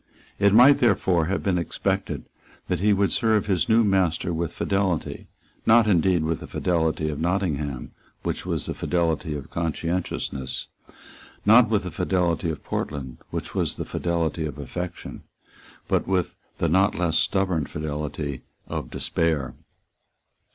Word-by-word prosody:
It 100 0 +5
might 125 +7 +7
therefore 95 -7 +3
have 95 +4 -2
been 90 -3 +1
expected 85 - -2 0.4
that - - 0
he 105 +3 +3
would 100 -1 +2
serve 110 -2 +2
his 95 -4 +1
new 115 +1 +5
master 95 -4 +1
with 85 0 -2
fidelity, 95 -4 -1 0.4
not 115 0 +7
indeed 90 -4 +3
with 80 0 -1
the - - -9
fidelity 80 -3 0
of 75 - -4
Nottingham, 80 -7 -1 0.3
which - - -2
was - - -2
the - - -2
fidelity 80 -3 -1
of 70 -2 -7
conscientiousness, 85 -5 -2 0.8
not 115 +2 +7
with 105 -4 +1
the 90 - -5
fidelity 85 0 0
of 80 - -5
Portland, 65 -4 -4
which - - -5
was - - 0
the - - -4
fidelity 85 -2 -1
of 75 -1 -7
affection, 90 +6 -6 0.7
but - - +1
with 95 -2 0 0.2
the 85 - +1
not 95 +5 +3
less 85 -2 +1
stubborn 95 -6 +1
fidelity 75 -3 -4 0.2
of - - -5
despair. 75 -6 0
85 Hz, 145 wpm, -25 LUFS, 80-95 Hz, 0.8 s, might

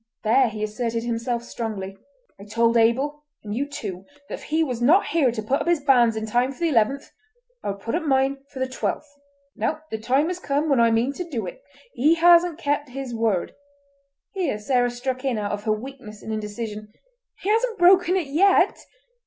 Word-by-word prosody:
There 235 +3 +4
he 215 -1 -5
asserted 230 +1 -2
himself 235 0 -2
strongly: 210 -5 -5 0.4
"I 200 - -11
told 230 +2 +1
Abel, 265 +6 +2 0.2
and 205 -1 -5
you 280 +4 -1
too, 195 -9 -6 0.3
that - - -6
if - - -14
he 315 +1 +1
was 250 -6 -3
not 320 +11 +5
here 290 -7 +2
to 220 -2 -5
put 260 +6 0
up - - -4
his 345 -3 +2
banns 245 -5 +4
in 220 0 -3
time 245 +4 +1
for 275 - -13
the 335 - +2
eleventh, 270 +1 +1 0.5
I - - -2
would 200 0 -5
put 230 - -4
up 335 - 0
mine 270 -2 +1
for - - -12
the 260 0 -1
twelfth. 260 +3 -3 0.5
Now 310 0 -2
the 220 - -3
time 265 +8 +1
has 360 0 -4
come 295 -1 -1
when 275 -4 +3
I 230 0 +5
mean 230 +4 +1
to 350 +2 -6
do 240 -8 -3
it. - - -8 0.3
He 295 +7 +3
hasn't 345 0 +5
kept 290 -3 -1
his 260 -1 -6
word"—here 280 - -4
Sarah 245 +3 +1
struck 255 +2 -4
in 260 -4 0
out 205 -1 -2
of 205 0 -4
her 215 - +1
weakness 215 -1 -6
and 220 - -4
indecision: 215 0 -5 0.5
"He 395 - -1
hasn't 450 +1 +1
broken 360 0 +5
it 370 -4 0
yet!" 360 +8 +3
260 Hz, 200 wpm, -23 LUFS, 225-295 Hz, 0.5 s, not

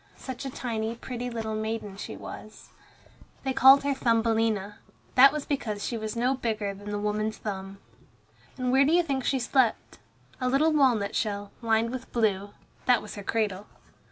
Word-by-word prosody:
Such 260 +1 -7
a - - -2
tiny, 230 -3 -3
pretty 245 +1 -5
little 225 -2 -4
maiden 215 -2 -3
she 200 - -7
was. 215 0 -10 0.7
They 265 -1 -1
called 270 +2 +7
her 285 0 +1
Thumbelina. 225 -4 +1 0.3
That 270 +2 +8
was 300 -1 -4
because 215 -8 -2
she 240 - -2
was 220 -1 -4
no 245 +3 +2
bigger 220 -6 -2
than 205 +1 -9
the 205 - -2
woman's 210 +1 -1
thumb. 195 -1 -6 0.8
And 250 -1 -1
where 265 +2 +5
do 295 +4 +2
you 350 0 +5
think 275 -5 -2
she 270 - +1
slept? 250 -2 0 0.4
A 255 -1 0
little 305 +5 +3
walnut 245 -9 +2
shell, 205 -2 -2
lined 225 0 +1
with 255 0 -7
blue, 205 -4 0 0.4
that 250 -2 +4
was 210 - -8
her 205 - -7
cradle. 210 -2 -1
230 Hz, 175 wpm, -27 LUFS, 210-260 Hz, 0.8 s, That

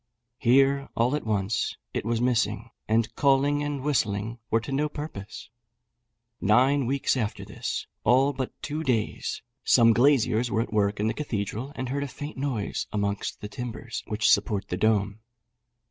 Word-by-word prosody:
Here, 135 +2 +3
all 120 +5 +2
at 150 - -4
once, 105 0 0 0.2
it - - -2
was 115 0 0
missing; 115 -2 0 0.2
and 110 +1 +1
calling 140 +2 +3
and 145 -2 -3
whistling 115 -5 0
were 115 - +3
to 140 - -7
no 150 +3 +1
purpose. 115 -9 -8 0.9
Nine 130 +6 +3
weeks 140 +1 +1
after 110 -5 -2
this, - - -4 0.2
all 130 +5 +4
but 130 -1 -5
two 150 +2 -3
days, 125 -8 -1 0.2
some 115 -1 +6
glaziers 120 -2 +3
were 110 - +1
at 115 - -5
work 100 -1 +1
in 105 - +1
the 110 - +1
cathedral, 115 -1 -3
and 130 -3 -4
heard 140 +2 -1
a - - -3
faint 145 +3 -7
noise 130 -7 -2
amongst 100 -1 -2
the 105 - -5
timbers 115 -2 -6
which 110 0 0
support 100 -1 +2
the 90 - -2
dome. 105 0 +1
120 Hz, 160 wpm, -26 LUFS, 105-135 Hz, 0.9 s, some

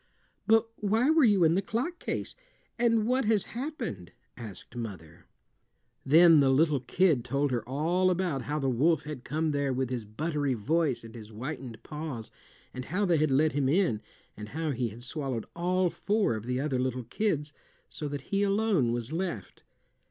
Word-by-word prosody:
"But 225 0 +5
why 220 +7 +2
were 320 -2 +5
you 205 -6 +5
in 160 0 +5
the 190 - +2
clock 250 - -3
case? - - -4 0.5
And 230 -2 +3
what 255 +2 +1
has 215 -2 +2
happened?" 240 - -5 0.2
asked 110 -5 -10
the 120 - -7
mother. 85 -8 -8 0.8
Then 165 +2 +7
the 135 -1 +4
little 145 +1 +3
kid 150 0 +2
told 140 +3 0
her 120 -2 0
all 170 +7 +1
about 180 -6 0
how 150 +1 -2
the 135 -3 -1
wolf 150 +5 +2
had 150 -4 -7
come 155 +3 -1
there 140 -1 0
with 130 0 -1
his 120 -3 -2
buttery 145 +5 -2
voice 135 +1 0
and 115 -1 -11
his 110 -3 -9
whitened 125 +1 -7
paws, 150 -7 -6 0.4
and 130 0 -6
how 200 +4 0
they 175 -3 +3
had 155 0 +2
let 150 +4 +3
him 140 -2 0
in, 155 - +2 0.3
and 105 0 -8
how 160 +1 -2
he 125 -3 -1
had 115 +3 -11
swallowed 130 -4 -3
all 180 +1 +1
four 205 - +1
of 110 +1 -6
the 125 0 -1
other 135 -2 -1
little 130 -1 -1
kids, 150 - -1 0.3
so 150 - -5
that 145 -1 -4
he 200 0 +2
alone 200 - +2
was 120 +4 -3
left. 170 - -4
150 Hz, 185 wpm, -29 LUFS, 125-185 Hz, 0.8 s, Then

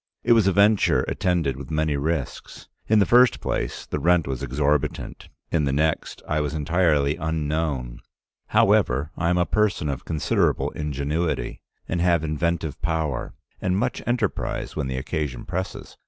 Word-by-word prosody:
It - - +5
was 110 -4 +4
a - - +5
venture 100 +2 +4
attended 90 -8 0
with 70 -2 -8
many 80 -1 0
risks. 75 0 -3 0.2
In 110 - +4
the 100 - +5
first 125 +3 +5
place - - -3
the - - -3
rent 90 -1 +3
was 65 -2 -4
exorbitant, 70 +2 -1 0.2
in 80 -3 +2
the 70 - 0
next 80 +3 -1
I 75 0 0
was 75 0 -2
entirely 75 -2 +2
unknown. 75 -6 -2 0.5
However, 70 +5 +3
I 85 -1 0
am 90 - +2
a 90 - +3
person 100 -4 +1
of 70 - -4
considerable 80 -3 0
ingenuity, 75 +3 -2 0.3
and 85 - -1
have 85 -2 +3
inventive 80 0 -2
power, 80 -5 -2 0.3
and 90 0 +1
much 120 +4 -1
enterprise 120 -4 -1
when 75 -4 -2
the 65 0 -3
occasion 70 -2 -3
presses. 95 +2 -5
80 Hz, 155 wpm, -24 LUFS, 70-90 Hz, 0.5 s, It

